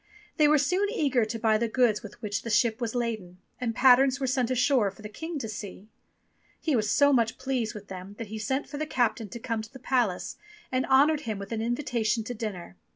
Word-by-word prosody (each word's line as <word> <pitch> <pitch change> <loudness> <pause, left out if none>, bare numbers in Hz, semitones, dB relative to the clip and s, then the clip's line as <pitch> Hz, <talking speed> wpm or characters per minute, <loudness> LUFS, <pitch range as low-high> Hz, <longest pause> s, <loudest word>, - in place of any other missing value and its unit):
They 305 -2 +5
were 300 +1 +5
soon 365 +8 +1
eager 275 - +1
to 220 +1 -4
buy 220 -1 +2
the 235 - +1
goods 230 -2 +2
with 210 -1 -11
which 205 -1 -2
the 230 - -6
ship 225 +2 +2
was 235 0 -2
laden, 220 -7 -3 0.2
and 230 -3 -2
patterns 265 +1 +5
were 270 - -1
sent 255 -2 0
ashore 255 -4 +3
for 195 +3 -15
the 210 - -6
King 320 +9 -6
to 235 - -4
see. 210 -1 -8 0.7
He 310 -4 0
was 215 -2 +1
so 285 +4 +4
much 230 -3 +2
pleased 260 -5 -2
with 205 -1 -9
them 190 +1 -8
that 230 - -5
he 220 0 -5
sent 265 +7 -1
for 290 - -7
the 310 - -2
captain 235 -6 0
to 235 - -7
come 230 -1 -3
to 220 - -11
the 265 - -10
palace, 245 -7 -1 0.3
and 255 0 0
honoured 285 +3 +4
him 215 - -2
with 200 +1 -8
an 225 -1 -2
invitation 235 -2 0
to 245 +2 -5
dinner. 195 - -6
235 Hz, 230 wpm, -27 LUFS, 215-265 Hz, 0.7 s, They